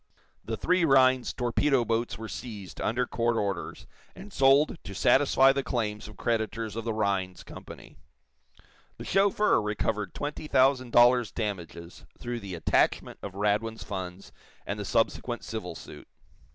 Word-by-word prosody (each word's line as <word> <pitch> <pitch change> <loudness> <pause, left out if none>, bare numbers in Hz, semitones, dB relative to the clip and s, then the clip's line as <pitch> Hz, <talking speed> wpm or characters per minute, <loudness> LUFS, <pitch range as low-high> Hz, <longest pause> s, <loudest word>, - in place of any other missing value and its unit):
The 110 -1 -4
three 180 - +2
Rhinds 130 -4 +4
torpedo 125 +1 +1
boats 115 +1 -1
were 110 - -7
seized, 105 -6 -8
under 125 +3 0
court 120 -1 0
orders, 100 -3 -3 0.3
and 195 +2 -11
sold 135 +4 +4
to 100 - -8
satisfy 135 +4 +4
the 140 - 0
claims 105 -6 -3
of 105 -2 -13
creditors 110 -1 -2
of 115 0 -5
the 115 - -1
Rhinds 95 -4 -1
Company. - - -12 1.0
The - - -8
chauffeur 200 - +3
recovered 105 -1 -2
twenty 150 +1 -5
thousand 130 -3 +3
dollars 120 -2 +5
damages 85 -4 -6
through 120 0 -5
the 100 -4 -7
attachment 85 - +1
of 95 -2 -7
Radwin's 105 +2 -1
funds 95 -1 -7 0.3
and - - -4
the - - -4
subsequent - - -1
civil - - -6
suit. - - -11
115 Hz, 145 wpm, -28 LUFS, 105-130 Hz, 1.0 s, dollars